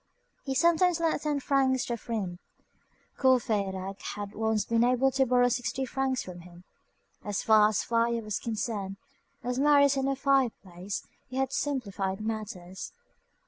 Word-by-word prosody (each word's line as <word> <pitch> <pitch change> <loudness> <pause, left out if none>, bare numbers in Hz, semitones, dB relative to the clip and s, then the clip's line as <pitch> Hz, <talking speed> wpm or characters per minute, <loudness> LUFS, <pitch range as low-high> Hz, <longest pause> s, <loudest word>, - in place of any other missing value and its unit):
He 270 -1 -2
sometimes 340 +3 +3
lent 325 -3 +1
ten 295 -2 0
francs 265 -2 +2
to 240 - -2
a - - -2
friend. 205 -7 -4 0.8
Courfeyrac 200 -7 +1
had 205 0 -6
once 220 -2 0
been 230 0 +2
able 255 +2 +3
to 265 0 +2
borrow 245 0 +4
sixty 245 +2 -1
francs 260 -1 -2
of 180 -1 -8
him. 175 0 -14 0.6
As 205 -1 -2
far 215 -1 +6
as 215 - 0
fire 230 0 +1
was 215 -1 -3
concerned, 210 -4 -3 0.5
as 250 +1 -2
Marius 285 -1 +5
had 270 -1 0
no 275 0 +1
fireplace, 220 -9 -1 0.3
he 255 - -8
had 265 0 0
"simplified 200 -9 -2
matters." 210 -4 -5
235 Hz, 150 wpm, -29 LUFS, 205-265 Hz, 0.8 s, far